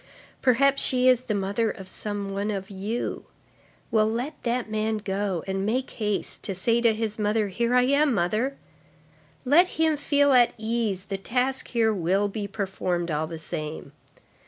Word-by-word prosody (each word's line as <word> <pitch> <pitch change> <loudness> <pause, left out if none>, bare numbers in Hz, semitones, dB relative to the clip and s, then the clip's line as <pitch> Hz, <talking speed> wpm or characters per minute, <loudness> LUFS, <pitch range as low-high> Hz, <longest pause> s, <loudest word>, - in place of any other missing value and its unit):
Perhaps 275 +2 +3
she 255 0 +3
is 255 -1 +4
the 215 -4 -1
mother 200 +3 0
of 190 -3 -7
some 205 +1 -4
one 200 +2 -2
of 195 -1 -4
you. 205 +5 -4 0.7
Well, 215 -1 +3
let 245 +7 -2
that 240 0 -1
man 215 0 -1
go, 195 -3 -2
and 195 0 -2
make 250 +6 -1
haste, 210 -2 -2
to 195 - -2
say 230 +6 +2
to 230 -1 +5
his 220 -1 -3
mother: 210 0 +1
'Here 235 +5 0
I 250 - +5
am, 280 +3 +3
mother!' 215 +10 0 0.9
Let 320 +8 +6
him 320 -1 +2
feel 285 -1 +3
at 240 -2 +5
ease, 220 -4 -2
the 195 -2 -4
task 255 +5 0
here 225 -3 +2
will 190 +2 +1
be 205 0 -4
performed 185 -4 -2
all 155 +1 -1
the 165 0 -6
same. 155 -1 -6
215 Hz, 170 wpm, -25 LUFS, 195-250 Hz, 0.9 s, Let